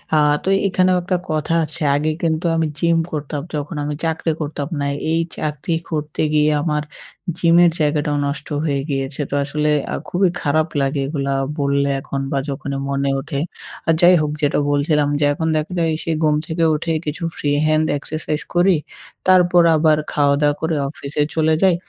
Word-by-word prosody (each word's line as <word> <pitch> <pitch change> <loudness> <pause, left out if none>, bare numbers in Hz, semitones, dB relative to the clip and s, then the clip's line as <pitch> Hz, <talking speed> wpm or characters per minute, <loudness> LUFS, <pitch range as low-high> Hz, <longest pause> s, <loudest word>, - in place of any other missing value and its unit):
আ - - +5 0.3
তো - - -8 0.2
এখানেও 185 -1 +2
একটা 180 +1 0
কথা 155 +1 -1
আছে 155 +2 -7
আগে 155 +2 +1
কিন্তু 165 0 0
আমি 160 -1 +1
জিম 170 -1 +3
করতাম 150 -1 -3
যখন 145 +2 -4
আমি 150 0 -2
চাকরি 160 0 0
করতাম 145 -1 -3
না। 140 - -1 0.3
এই 165 - +2 0.2
চাকরি 150 +2 -2
করতে 150 -2 -3
গিয়ে 150 0 +4
আমার 150 -1 0 0.5
জিমের 170 0 +5
জায়গাটাও 150 -1 +1
নষ্ট 140 0 -4 0.2
হয়ে 140 -2 0
গিয়েছে। 135 +1 -2
তো - - -6
আসলে 150 +1 -1 0.2
আ - - 0
খুবই 180 0 +2
খারাপ 155 +2 +1
লাগে 135 +1 0
এগুলা 140 -2 -2 0.3
বললে 140 0 +1
এখন 135 0 -4
বা 140 - 0
যখনই 140 0 -4
মনে 140 0 0
ওঠে। 140 0 -4 0.5
আর 165 - +5
যাই 180 +1 +7
হোক 150 -1 -1
যেটা 145 0 +2
বলছিলাম 145 0 +2
যে 145 - +3
এখন 160 +2 -2
দেখা 155 +4 -3
যায় 165 -1 +2
সে 165 - -2
ঘুম 150 -1 +3
থেকে 165 +1 -1
উঠে 165 +2 -2
কিছু 150 +3 -4
Free 145 0 0
hand 155 0 +3
exercise 155 +1 -4
করি। 180 +1 +5 0.5
তারপর 180 -1 +5
আবার 155 -1 +4
খাওয়া-দাওয়া 145 0 +2
করে 160 0 0
অফিসে 145 0 -4
চলে 160 0 +3
যাই। 185 -2 +5
150 Hz, 175 wpm, -20 LUFS, 145-165 Hz, 0.5 s, যাই